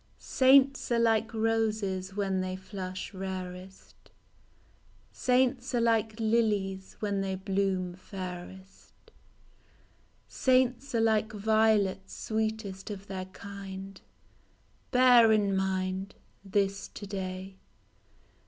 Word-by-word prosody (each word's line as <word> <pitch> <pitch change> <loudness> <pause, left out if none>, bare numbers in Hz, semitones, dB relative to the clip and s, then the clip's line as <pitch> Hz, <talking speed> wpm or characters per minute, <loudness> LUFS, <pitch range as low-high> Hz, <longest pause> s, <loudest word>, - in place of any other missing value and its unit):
Saints 270 0 +4
are 235 - +3
like 225 -1 +2
roses 215 -4 -1
when 195 -2 0
they 185 0 -3
flush 190 0 -6
rarest, 185 0 -8 1.0
Saints 250 0 +1
are - - +3
like 225 -1 +1
lilies 210 -4 0
when 200 -2 0
they 190 -1 -2
bloom 190 -1 -1
fairest, 185 0 -9
DE - - -23
PROFUNDIS. - - -32 1.0
Saints 255 0 +1
are 230 - +3
like 220 -1 +2
violets 215 -3 +1
sweetest 220 -3 -3
of 200 -1 -7
their 190 -2 -5
kind, 195 0 -9 0.9
Bear 250 -3 +6
in 205 -2 +2
mind 190 0 -2 0.3
This 200 0 -1
to 205 - -9
day. 190 -1 -5
200 Hz, 105 wpm, -29 LUFS, 190-225 Hz, 1.0 s, Bear